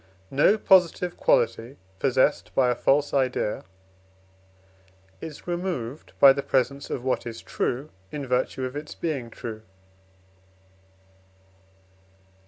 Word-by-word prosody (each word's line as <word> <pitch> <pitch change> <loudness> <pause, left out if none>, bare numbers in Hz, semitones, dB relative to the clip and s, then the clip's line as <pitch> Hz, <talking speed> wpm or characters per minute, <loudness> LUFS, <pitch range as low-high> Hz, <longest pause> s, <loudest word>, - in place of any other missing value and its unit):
No 150 +10 +4
positive 180 -3 +3
quality 475 - +1 0.2
possessed 135 +2 +1
by 125 -2 +4
a - - 0
false 145 +4 +2
idea 130 -6 0 1.6
is 155 -3 -8
removed 175 -7 -4
by 140 -1 +9
the 140 - -2
presence 135 +1 0
of 120 - -4
what 130 -2 -1
is 115 -1 -6
true, 135 +5 -2 0.2
in 145 -2 -4
virtue 130 +1 -1
of 130 +2 -6
its 150 +1 -6
being 140 -8 -3
true. 110 -1 -7
135 Hz, 110 wpm, -25 LUFS, 125-155 Hz, 1.6 s, by